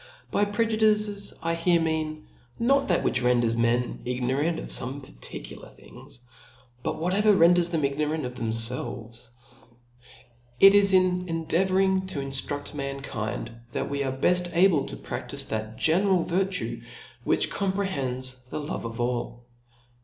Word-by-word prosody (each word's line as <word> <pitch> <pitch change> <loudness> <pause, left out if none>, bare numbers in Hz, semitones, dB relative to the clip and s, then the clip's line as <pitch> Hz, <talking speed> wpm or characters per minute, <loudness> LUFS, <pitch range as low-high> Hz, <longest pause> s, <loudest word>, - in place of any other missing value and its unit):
By 205 - +2
prq 220 +3 0
indices, 210 -2 +2
I 165 0 0
here 170 +1 +2
nacan, 155 -1 -2 0.4
rtot 275 +4 +3
that 175 - +1
which 125 - +1
renders; 120 -2 +2
m?n 115 +1 0
ig 125 0 -3
norant 145 +7 0
of - - -7
fome 135 +3 +1
particular - - -8
things, 125 - -13 0.6
but - - -2
whatever 195 +5 +2
renders 175 0 +5
tbem 165 -3 -1
ignorant 150 +2 -1
of 125 - -5
thcpfelvcj. 115 0 -3 1.3
It 195 0 +9
is 200 -1 +5
in 180 -1 +3
endeavouring 190 +3 +1
to 160 - -3
inftrufl: 135 +1 -2
mankind^ 135 -6 -5 0.2
that - - -3
we 140 0 -1
are 135 - -1
beft 175 +7 +1
able 170 -6 +4
to - - -7
praftife - - -5
that 110 0 -4
general 180 +2 +3
virtue, 190 +1 -1 0.4
which - - +1
comprehends 130 -11 -2
the - - -4
love 145 -5 -5
of 115 +1 -6
all. 120 0 -3
155 Hz, 140 wpm, -26 LUFS, 125-185 Hz, 1.3 s, It